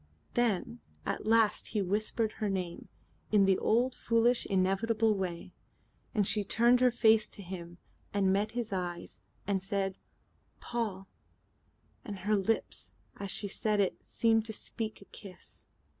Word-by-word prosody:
Then 235 -1 0 0.3
at - - -3
last 225 -1 +3
he 215 - 0
whispered 215 +3 +1
her 210 - -1
name, 185 -3 -4 0.4
in 205 -2 +5
the 190 -1 +3
old 245 +3 +2
foolish 235 +1 +2
and - - -2
inevitable 220 +4 +2
way. 180 -2 -4 0.6
And 205 -2 +3
she 210 +1 +1
turned 235 +5 +4
her 255 0 +5
face 220 -2 +4
to 200 - -9
him, 175 -2 -8 0.3
and 195 -2 +2
met 210 +3 0
his 235 -4 -3
eyes 175 -2 -4 0.2
and 195 -1 0
said 195 -1 -2 0.6
"Paul," 210 -5 -3 1.0
and 205 -2 -6
her 210 +3 +2
lips 210 +3 -1 0.2
as 200 -1 -5
she 205 - +1
said 210 +1 0
it 195 -2 +2
seemed 225 -1 +2
to 220 - -4
speak 220 0 -4
a - - -13
kiss. 195 -2 -13
210 Hz, 150 wpm, -31 LUFS, 195-225 Hz, 1.0 s, in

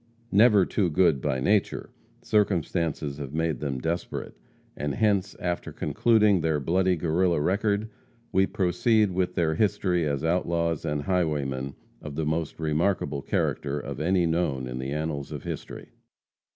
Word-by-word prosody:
Never 105 -2 +6
too 95 -5 0
good 80 -5 +3
by 65 - 0
nature, 100 +9 0 0.3
circumstances 85 -7 0
have 70 0 -6
made 80 -4 0
them 70 -3 -2
desperate, 85 +6 -4 0.4
and 75 -1 -3
hence, 105 -2 +1
after 90 -1 -3
concluding 105 -5 +3
their 80 -2 +1
bloody 90 +5 +2
Guerrilla 85 +1 +1
record, 100 +6 +1 0.4
we 95 0 +3
proceed 105 +2 +2
with 90 0 -1
their 80 -2 +1
history 90 -3 +1
as 70 0 -2
outlaws 85 -1 0
and 75 -2 -1
highwaymen 70 -7 -1 0.3
of 75 -2 -7
the 80 - -1
most 80 +1 -2
remarkable 75 -2 0
character 70 +2 -1
of - - -6
any 90 +2 +2
known 80 -6 0
in 60 0 -5
the 65 +1 -4
annals 75 -1 -3
of - - -6
history. - - -7
85 Hz, 145 wpm, -26 LUFS, 75-95 Hz, 0.4 s, Never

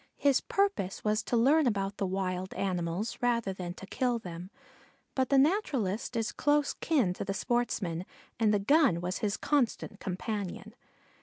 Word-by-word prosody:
His 280 -2 +3
purpose 395 - 0
was 215 +1 +1
to 235 - 0
learn 280 +5 +4
about 200 -3 -1
the 195 - -1
wild 185 0 -2
animals 180 +3 -2
rather 235 -5 +1
than 180 -2 -6
to 195 - -9
kill 245 +4 0
them; 175 -3 -8 0.6
but 260 -2 0
the 275 - +4
naturalist 265 - +1
is 225 -2 0
close 295 0 +2
kin 260 - +1
to - - -5
the 195 0 -3
sportsman, 195 -7 -1 0.3
and 220 -2 +4
the 210 - +4
gun 260 - +4
was 180 +2 -3
his 210 -3 -1
constant 250 -7 0
companion. 200 +2 -4
215 Hz, 160 wpm, -30 LUFS, 185-255 Hz, 0.6 s, learn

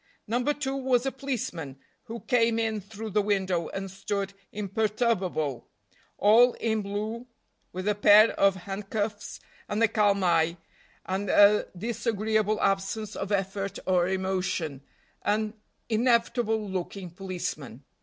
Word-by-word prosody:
No. 235 +3 0
2 275 -1 -1
was 260 -2 +1
a 270 - 0
policeman, 210 - -4 0.3
who 230 -1 -7
came 230 -3 +2
in 220 -2 -1
through 215 +2 -8
the 210 +2 +3
window, 190 -4 0
and 195 -1 -5
stood 200 0 -3 0.2
imperturbable, 200 - -1 0.5
all 235 +4 +6
in 220 -1 -1
blue, 215 +4 -4 0.4
with 185 +2 -5
a 210 - +3
pair 210 +2 +7
of 195 -1 +3
handcuffs, 205 +3 -4 0.3
and 210 +2 0
a - - +6
calm 205 -3 +2
eye, 170 -1 +2 0.5
and 190 +1 -2
a 205 +2 +6
disagreeable 215 0 0
absence 195 +2 -1
of 195 +1 -4
effort 195 0 -2
or 180 -2 +2
emotion 185 -6 -2 0.4
an 215 0 0 0.3
inevitable 230 -1 +1
looking 185 -1 -5
policeman. 170 - -6
205 Hz, 125 wpm, -27 LUFS, 190-225 Hz, 0.5 s, pair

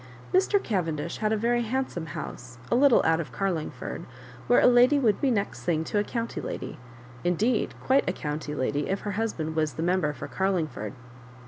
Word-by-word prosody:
Mr. 385 +2 +4
Cavendish 170 - -2
had 215 -1 0
a 220 - +2
very 240 +2 +1
hand 260 +4 -1
some 165 -2 -5
house 125 0 -7
a - - +4
little 265 -1 +5
out 160 0 +3
of 160 - -4
Carlingford, 185 -6 -3 0.4
where 245 - +6
a - - +4
lady 250 +3 +6
would 230 -7 +2
be 275 - +3
next 210 -4 -1
thing 160 -2 +1
to 205 - 0
a - - +2
county 230 +2 -3
lady - - -5 0.2
— 120 0 -18
indeed 210 +7 +1
quite 265 -6 +3
a - - 0
county 150 -2 -4
lady, 145 +2 -1
if 195 +1 -1
her 205 - -3
husband 185 -7 -2
was 155 -1 +1
the 160 - -3
Member 175 -3 +2
for 135 - -7
Carlingford. 155 - -1
190 Hz, 200 wpm, -27 LUFS, 155-235 Hz, 0.4 s, where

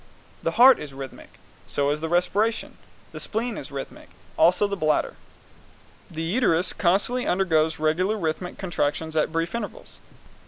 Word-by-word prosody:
The 165 - -1
heart 255 +2 +8
is 140 -2 -8
rhythmic, 135 -1 -10 0.3
so 140 0 0
is 150 +1 -2
the 160 - -3
respiration. 200 +6 0 0.3
The - - -8
spleen 230 +1 -2
is 145 - -8
rhythmic, 135 -1 -7
so - - -26 0.2
also 175 +5 +5
the 200 0 -2
bladder. 155 -5 0 0.9
The 160 0 -5
uterus 175 -2 +1
constantly 205 +8 +1
undergoes 160 -4 +2
regular 175 +7 +1
rhythmic 175 0 -3
contractions 160 -3 -2
at 155 0 +1
brief 165 0 -2
intervals. 235 - -6
170 Hz, 150 wpm, -24 LUFS, 155-205 Hz, 0.9 s, heart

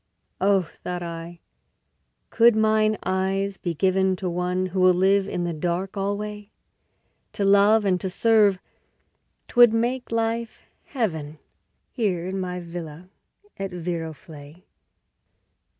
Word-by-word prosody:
Oh, 195 -1 +3
thought 175 +1 -7
I, 170 0 -8 0.9
could 235 -1 +5
mine 215 0 +2
eyes 190 +1 -1
be 175 -2 -4
given 190 +2 +2
To 180 0 -4
one 180 +1 -1
who 185 0 -2
will 185 -1 +5
live 195 +2 +3
in 180 - -3
the 175 -1 -2
dark 175 +5 -3
alway! 205 +1 -4 0.8
To 200 - -1
love 200 +2 +5
and 185 -2 +1
to 190 - -2
serve 210 0 +3 0.9
'twould 240 -2 +6
make 240 +2 -1
life 230 0 -2 0.2
Heaven 160 - -3 0.5
Here 190 -8 -1
in 190 +1 -3
my 180 -1 -4
villa 170 0 -9 0.5
at 195 0 -3
Viroflay. 165 -2 -7
190 Hz, 120 wpm, -24 LUFS, 175-210 Hz, 0.9 s, twould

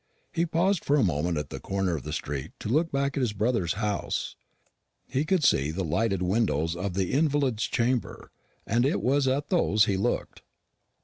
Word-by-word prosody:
He 170 +1 0
paused 170 +3 +1
for 145 - +2
a 140 - +3
moment 85 -1 0
at 75 - -4
the - - -5
corner 95 -3 -1
of 75 - -4
the - - -6
street 70 -1 -4
to - - -4
look 160 +7 +2
back 140 0 0
at 140 - 0
his 120 -5 0
brother's 105 -5 0
house. 105 -1 -2 0.7
He 140 +4 -1
could 180 -1 +1
see 70 - +3
the 90 +5 -2
lighted 95 +3 0
windows 90 -5 +1
of 90 +1 -3
the 95 -2 0
invalid's 140 -6 +1
chamber, 120 0 -1 0.3
and 120 +3 +2
it 140 +5 +1
was 135 +1 +2
at 140 +2 0
those 110 - +3
he 100 -2 0
looked. 95 - -2
115 Hz, 190 wpm, -27 LUFS, 90-140 Hz, 0.7 s, a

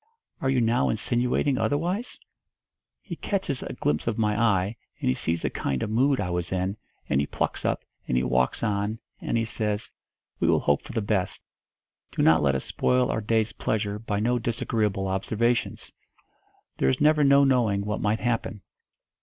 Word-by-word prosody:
Are 135 - +1
you 130 -2 +2
now 115 +2 +2
insinuating 125 +4 +1
otherwise?' 180 +11 -1 0.9
He - - -6
catches 185 -10 -2
a - - -5
glimpse 75 +7 -1
of 115 -1 0
my 105 -2 +1
eye, 105 -2 +2 0.2
and - - 0
he - - +3
sees 80 +5 -1
the - - 0
kind 65 -2 -2
of - - -3
mood 130 +4 +3
I 90 -3 -2
was 90 0 -2
in, 95 +1 -1 0.3
and 70 - +2
he 70 - -2
plucks - - -2
up, - - -1 0.2
and 60 - +1
he 65 - +2
walks 65 - +1
on, 105 0 0 0.2
and - - -1
he 115 - +1
says, 105 -2 -2 0.5
'We - - +2
will - - +4
hope 70 - +2
for - - -10
the 110 - -1
best. 100 -3 -1 0.7
Do - - 0
not 80 0 +5
let 70 -2 +2
us 65 - -2
spoil 125 0 +1
our 110 - -1
day's 110 0 +1
pleasure 105 -1 -2
by 105 -2 -2
no 120 +3 +1
disagreeable 110 -4 -1
observations. 110 +5 -1 0.9
There 65 - +3
is - - 0
never 150 0 +4
no 140 0 +6
knowing 115 -7 +2
what 105 0 -2
might 110 +1 0
happen.' 115 -4 -2
110 Hz, 185 wpm, -26 LUFS, 95-120 Hz, 0.9 s, no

